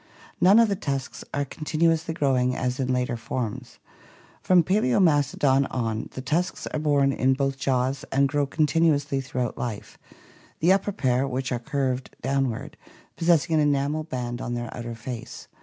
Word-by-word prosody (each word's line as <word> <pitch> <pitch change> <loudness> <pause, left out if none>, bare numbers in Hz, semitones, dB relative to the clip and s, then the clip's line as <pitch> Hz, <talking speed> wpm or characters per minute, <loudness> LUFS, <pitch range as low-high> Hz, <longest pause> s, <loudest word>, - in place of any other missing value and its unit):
None 195 +4 +7
of 230 -1 +6
the 200 - 0
tusks 140 -8 -4
are 145 0 -1
contin 155 +3 -5
uously 165 -1 +2
growing 125 -4 +1
as 125 0 -2
in 130 -1 0
later 125 -1 0
forms. 115 -1 -5 0.6
From 180 -2 +4
Pakzotnastodon 145 - +2
on, 115 -3 -2
the 130 - -6
tusks 170 +7 -1
are 155 - -3
borne 145 -2 +2
in 130 0 +2
both 135 0 -1
jaws 130 0 0
and 140 +1 +3
grow 145 0 0
continuously 150 -2 +1
throughout 125 -2 -3
life, 115 -4 -5 0.6
the 175 +4 +5
upper 195 +1 0
pair, 130 -5 0
which 130 0 -3
are 125 - -1
curved 130 -1 -2
downward, 135 -3 -1 0.4
possessing 165 -1 +2
an 155 - +4
enamel 145 +1 +1
band 125 -5 -4
on 120 - -3
their 120 -1 -5
outer 120 -1 -6
face. 115 0 -8
135 Hz, 160 wpm, -25 LUFS, 125-155 Hz, 0.6 s, None